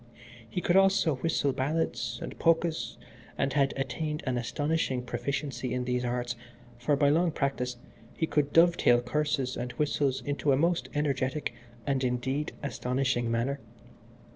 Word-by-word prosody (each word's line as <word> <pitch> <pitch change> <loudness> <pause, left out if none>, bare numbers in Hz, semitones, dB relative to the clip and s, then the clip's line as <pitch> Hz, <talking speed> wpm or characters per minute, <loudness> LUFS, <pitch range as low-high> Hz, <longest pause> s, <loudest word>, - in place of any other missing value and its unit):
He 180 - -2
could 175 - +2
also 195 -6 +4
whistle 140 -1 +1
ballads 130 -4 -1
and - - -7
polkas, 165 -8 +1 0.4
and 135 -1 0
had 140 -1 +3
attained 150 +2 -2
an 130 - 0
astonishing 135 +1 -1
proficiency 140 -1 -3
in 125 0 -1
these 125 0 0
arts; 120 0 -1 0.4
for, 130 +4 +2
by 140 0 +4
long 170 +4 +3
practice, 135 -5 -1 0.4
he 160 - +2
could 145 -2 +1
dovetail 165 -8 +5
curses 140 0 0
and 125 0 -4
whistles 145 -3 0
in 145 0 -1
a 140 -2 +4
most 170 +5 +1
energetic 140 -1 0 0.3
and, 135 -2 0
indeed, 130 +4 -1
astonishing 125 -3 0
manner. 120 +5 0
140 Hz, 140 wpm, -29 LUFS, 125-150 Hz, 0.4 s, dovetail